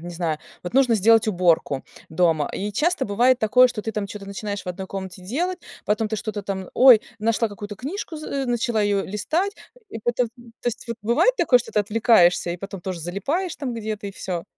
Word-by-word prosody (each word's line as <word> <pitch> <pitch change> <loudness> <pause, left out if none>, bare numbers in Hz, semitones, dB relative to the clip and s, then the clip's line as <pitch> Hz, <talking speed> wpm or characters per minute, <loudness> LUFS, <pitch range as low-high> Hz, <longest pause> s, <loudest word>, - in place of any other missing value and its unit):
не 175 - -7
знаю, 165 -3 -1 0.2
вот 175 - -6
нужно 260 -3 +4
сделать 225 +1 +4
уборку 170 -7 +1 0.2
дома, 160 -3 +2
и 205 +2 -3
часто 300 - +1
бывает 240 +4 +3
такое, 250 +3 +5
что 215 -3 -5
ты 220 - -4
там 205 -1 -2
чё-то 200 0 -8
начинаешь 200 0 -5
в - - -24
одной 190 +1 -5
комнате 190 -1 -7
делать 340 - -2 0.3
потом 215 +1 0
ты 220 - -2
что-то 210 0 -4
там 190 -2 -5
ой, 250 -4 +7 0.2
нашла 230 +1 +1
какую-то 205 0 -8
книжку 320 - -5
з 280 -3 -3
начала 235 -2 0
ее 205 -1 +1
листать 320 - -1 0.4
и - - -6
потом, 240 +1 0
т - - -33 0.3
то - - -8
есть 240 +2 -6 0.2
бывает 240 - +3
такое, 260 -7 +5
что 240 - -8
ты 210 - +2
отвлекаешься 205 -5 +4
и 175 - -3
потом 195 0 -8
тоже 185 -1 -5
залипаешь 275 - -2
там 255 -4 -4
где-то, 215 -2 -4
и - - -4
всё? 175 -3 -5
215 Hz, 205 wpm, -23 LUFS, 190-245 Hz, 0.4 s, ой